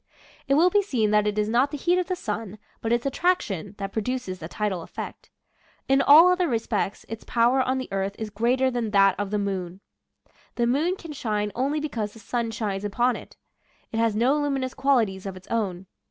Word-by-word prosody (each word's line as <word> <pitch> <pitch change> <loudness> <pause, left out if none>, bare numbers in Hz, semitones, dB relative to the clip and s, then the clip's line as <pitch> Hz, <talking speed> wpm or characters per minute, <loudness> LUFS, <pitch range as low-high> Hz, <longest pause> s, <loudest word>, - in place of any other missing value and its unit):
It 275 - +3
will 345 +5 +5
be 410 - +4
seen 235 - 0
that 210 0 +3
it 210 0 -1
is 210 0 +1
not 245 +5 +2
the 295 - -5
heat 350 +5 +2
of 360 - -2
the 370 - -1
sun, 215 - -5 0.2
but 225 - -2
its 235 +1 +1
attraction, 240 - -1
that 195 -1 -4
produces 220 -4 -3
the 160 - -6
tidal 200 -1 -2
effect. - - -8 0.6
In 270 +1 +4
all 315 +5 +8
other 360 -1 +2
respects 225 -5 -2
its 225 0 -7
power 240 +3 +2
on 260 +1 0
the 260 - -4
earth 195 +1 -2
is 220 -1 -5
greater 250 +5 +1
than 240 -3 -2
that 195 -2 +5
of 205 -1 -2
the 210 - -1
moon. 190 -3 -3 0.8
The 240 - +1
moon 300 +9 +1
can 335 -4 -10
shine 210 -6 -2
only 275 +6 0
because 225 -9 -3
the 225 - -13
sun 235 +2 -2
shines 210 -3 -3
upon 240 +5 +1
it. - - -11 0.5
It 225 - -3
has 225 -2 +2
no 255 +7 +3
luminous 275 -3 -1
qualities 220 -9 +1
of 190 -1 -6
its 185 - -15
own. 195 -5 -2
230 Hz, 210 wpm, -25 LUFS, 205-270 Hz, 0.8 s, all